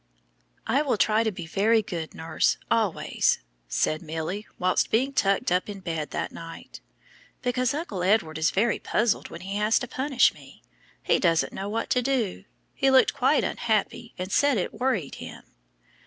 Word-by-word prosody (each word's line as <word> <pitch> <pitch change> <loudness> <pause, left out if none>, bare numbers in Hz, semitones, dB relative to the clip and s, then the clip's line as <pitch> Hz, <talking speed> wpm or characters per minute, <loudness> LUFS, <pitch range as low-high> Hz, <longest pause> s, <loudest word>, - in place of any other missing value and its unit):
"I 265 +6 +2
will 275 -7 0
try 215 +2 +3
to 220 - 0
be 175 -3 -7
very 215 +6 +2
good, 170 -5 -5
nurse, 160 -1 0
always," 220 -6 +1 0.3
said 155 - 0
Milly 165 +6 -4
while 185 0 +1
being 260 +5 +1
tucked 195 -7 +1
up 180 +3 +1
in 200 -1 -6
bed 165 -5 -4
that - - -3
night, 165 0 -10 0.6
"because 250 +2 0
Uncle 290 - -4
Edward 180 -5 +2
is 160 - +3
very 215 +4 +1
puzzled 225 0 0
when 170 - -9
he 195 +2 -4
has 210 +2 +3
to 245 - -2
punish 265 0 +2
me. - - -16 0.4
He - - +2
doesn't 165 -3 +2
know 195 +1 -4
what 225 +2 -3
to 250 - +3
do. 245 -6 -1 0.3
He 270 - +2
looked 265 -1 +5
quite - - +2
unhappy 230 +1 -1
and 185 +2 -5
said 285 +1 +3
it 180 - -2
worried 220 - -1
him." - - -9
210 Hz, 170 wpm, -26 LUFS, 180-240 Hz, 0.6 s, looked